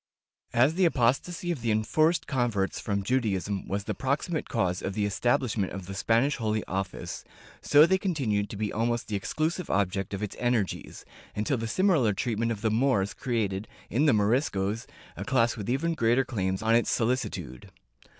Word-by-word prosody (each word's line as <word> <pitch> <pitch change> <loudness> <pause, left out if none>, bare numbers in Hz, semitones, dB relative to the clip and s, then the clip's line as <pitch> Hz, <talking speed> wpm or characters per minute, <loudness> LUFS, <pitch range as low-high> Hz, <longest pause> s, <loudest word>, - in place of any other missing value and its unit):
As 130 +6 +4
the 185 +2 +3
apostasy 165 +5 +1
of 155 -8 -4
the 115 - -1
enforced 155 +11 +2
converts 120 -8 0
from 100 -2 -2
Judaism 100 -5 -1
was 100 +1 -2
the 105 - -3
proximate 140 - -2
cause 95 -7 0
of 95 - -4
the 105 - +1
estabhshment 105 0 0
of 95 -1 -7
the 95 - -7
Spanish 115 +8 +2
Holy 110 -3 -1
Office, 95 0 -4 0.4
so 150 +1 +6
they 190 +2 +2
continued 125 - -1
to - - -6
be 105 0 -2
almost 120 +1 -1
the 105 - -1
exclusive 160 - -2
object 100 0 0
of 100 - -5
its 105 - -4
energies, 120 -5 -1 0.3
until 110 +6 0
the 115 0 -3
similar 150 - +3
treatment 115 +2 -1
of 105 -3 -4
the 110 -1 +1
Moors 110 -4 +2
created, 105 -5 -2 0.2
in 140 +8 +2
the 145 - +5
Moriscos, 105 0 +1 0.3
a - - -5
class 120 -2 +2
with 105 0 -5
even 155 +7 +1
greater 120 -1 +2
claims 95 -4 -2
on 110 +1 +3
its 115 0 +3
solicitude. 110 - -2
115 Hz, 175 wpm, -28 LUFS, 100-130 Hz, 0.4 s, so